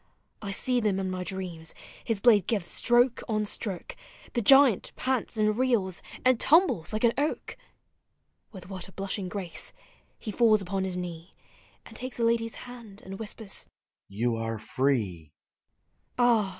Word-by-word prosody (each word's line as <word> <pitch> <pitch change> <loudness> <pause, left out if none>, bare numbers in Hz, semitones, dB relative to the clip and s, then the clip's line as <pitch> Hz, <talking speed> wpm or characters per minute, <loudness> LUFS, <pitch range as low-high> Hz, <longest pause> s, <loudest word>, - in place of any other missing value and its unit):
I 205 - -5
see 250 +5 +2
them 210 -4 +1
in 190 -1 -2
my 185 0 -3
dreams— 180 -4 -4 0.3
his 225 -4 -1
blade 205 -4 +5
gives 205 -6 0
stroke 240 +1 +3
on 215 -1 +1
stroke, 200 -3 -5 0.4
The 240 - +1
giant 270 -2 +6
pants 255 -3 -1
and 215 0 +2
reels— 225 -7 +1 0.2
and 255 -2 +5
tumbles 320 - +4
like 215 +1 -2
an 235 -1 +5
oak! 295 +2 -2
• - - -27 0.9
With 185 -4 -11
what 190 -1 -5
a - - -14
blushing 195 -1 -2
grace— 180 -4 -5 0.4
he 215 - -5
falls 220 -1 +4
upon 190 0 -2
his 185 -1 -3
knee 175 -1 -7 0.5
And - - -13
takes 255 0 -6
the 230 - +1
lady's 230 -1 +1
hand— 235 -5 -10
and 195 +1 -7
whispers, 220 -2 -3 0.2
" - - -66
You 120 -1 +1
arc 115 -1 -3
free! 110 - -1 0.4
" - - -46
Ah! 235 -5 +4
205 Hz, 165 wpm, -28 LUFS, 180-235 Hz, 0.9 s, giant